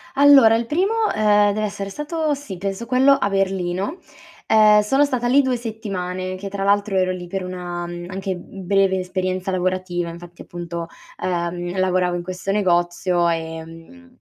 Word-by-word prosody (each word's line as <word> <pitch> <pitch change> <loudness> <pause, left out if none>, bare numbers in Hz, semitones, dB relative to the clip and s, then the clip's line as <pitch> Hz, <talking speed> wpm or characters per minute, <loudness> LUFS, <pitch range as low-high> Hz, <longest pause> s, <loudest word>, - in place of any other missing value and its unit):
Allora 275 -5 +7
il 235 +1 -1
primo, 360 - 0 0.2
ehm, 210 -1 +4
deve 215 +1 -1
essere 200 -1 -5
stato, 300 - -2
sì, 270 -10 -7
penso 195 +4 -4
quello 260 +3 +4
a 205 - 0
Berlino. 195 - -1 0.5
Ehm, 215 -1 +6
sono 270 +7 +3
stata 255 -4 -1
lì 270 +4 +5
2 260 -2 0
settimane, 190 -6 -4
che 195 +1 -6
tra 195 0 -4
l'altro 200 0 +2
ero 185 0 +2
lì 180 -1 -6
per 190 +1 -4
una, 175 -1 -5
mhmm, 175 0 -7
anche, 190 0 -3
mhmm, 185 +1 -10
breve 195 -1 +3
esperienza 185 0 -2
lavorativa, 185 -1 -1
infatti 170 +1 -11
appunto, 170 -1 -6 0.4
ehm, 175 0 -2
io 180 - -5
lavoravo 185 -1 +1
in 175 - -5
questo 185 +2 -4
negozio, 175 -2 +1
ehm, 165 +10 -7
190 Hz, 170 wpm, -21 LUFS, 175-215 Hz, 0.5 s, Allora